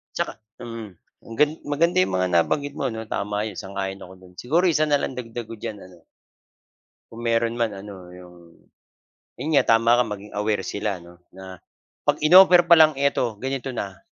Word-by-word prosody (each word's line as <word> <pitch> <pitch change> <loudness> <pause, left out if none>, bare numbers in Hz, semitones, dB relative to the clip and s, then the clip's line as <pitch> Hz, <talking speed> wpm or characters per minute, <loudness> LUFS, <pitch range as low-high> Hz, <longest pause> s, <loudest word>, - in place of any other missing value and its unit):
Tsaka, - - -3 0.2
hmm, 115 -2 -7 0.4
ang 115 - -9
gali 150 +1 +3
maganda 155 +4 +1
'yong 95 0 +2
mga 90 0 +1
nabanggit 145 - 0
mo, - - -2
'no? 110 -2 -5
Tama 105 +2 -2
'yon 100 - -11
sang-ayon 95 -1 -5
ako 95 - -13
do'n. 90 -1 -17
Siguro 160 +9 0
isa 155 -1 +2
na 145 -1 +1
lang 130 - -4
dagdag 115 -1 -7
ko 115 - -8
diyan 105 0 -6
ano, 85 -3 -20 1.0
kung 115 +1 -10
meron 115 0 0
man 115 -3 -1
ano, 95 -3 -10
'yong 90 -1 -14 1.1
'yon 155 - -3
nga - - +4
tama 115 +1 +3
ka 125 - +4
maging 105 -1 -8
aware 105 0 0
sila 100 -3 -4
'no, 85 0 -16 0.2
na 95 -1 -10 0.5
'pag - - +1
in-offer 180 +2 +8
pa 170 - +8
lang 155 -1 +6
eto 135 -5 0
ganito 135 -1 -4
na 100 -4 -5
115 Hz, 185 wpm, -23 LUFS, 95-135 Hz, 1.1 s, in-offer